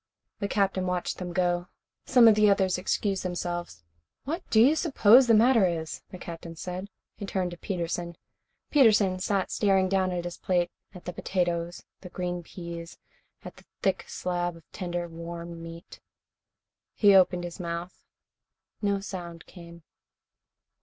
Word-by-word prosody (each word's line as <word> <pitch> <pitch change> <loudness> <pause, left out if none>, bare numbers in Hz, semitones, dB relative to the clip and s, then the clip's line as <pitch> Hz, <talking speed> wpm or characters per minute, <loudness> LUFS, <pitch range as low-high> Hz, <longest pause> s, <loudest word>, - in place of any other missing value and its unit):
The 200 - -1
Captain 195 -2 0
watched 180 -1 -2
them 180 -1 -5
go. 175 0 0 0.4
Some 245 -3 +7
of 220 - +8
the 210 0 +4
others 190 -2 +2
excused 195 +1 -1
themselves. 175 - -4 0.4
"What 325 +6 -3
do 220 - +4
you 270 +7 +6
suppose 260 -6 +5
the 230 - +6
matter 225 -2 +5
is?" 160 -2 -4
the 185 - -9
Captain 170 -1 -8
said. 180 +3 -5 0.3
He 200 - -6
turned 185 -2 -1
to 175 - -8
Peterson. 170 -2 -4 0.5
Peterson 215 -9 +4
sat 195 0 -1
staring 195 -2 +2
down 190 -1 +1
at 175 -1 -2
his 175 - -6
plate, 175 -2 0 0.2
at 180 - -11
the 180 - -5
potatoes, 175 -1 -2 0.2
the 180 - -10
green 180 -1 -3
peas, 170 -1 -8 0.5
and - - -6
at - - -37
the - - -17 0.2
thick - - +1
slab 175 -1 -2
of 165 - -15
tender, 175 -2 -4
warm 170 0 -8
meat. 165 +1 -10 1.0
He 205 -2 +6
opened 180 -2 +4
his 175 +2 -7
mouth. 170 +1 -5 0.8
No 200 -1 0
sound 175 -4 -7
came. 170 -2 -13
180 Hz, 155 wpm, -27 LUFS, 170-195 Hz, 1.0 s, of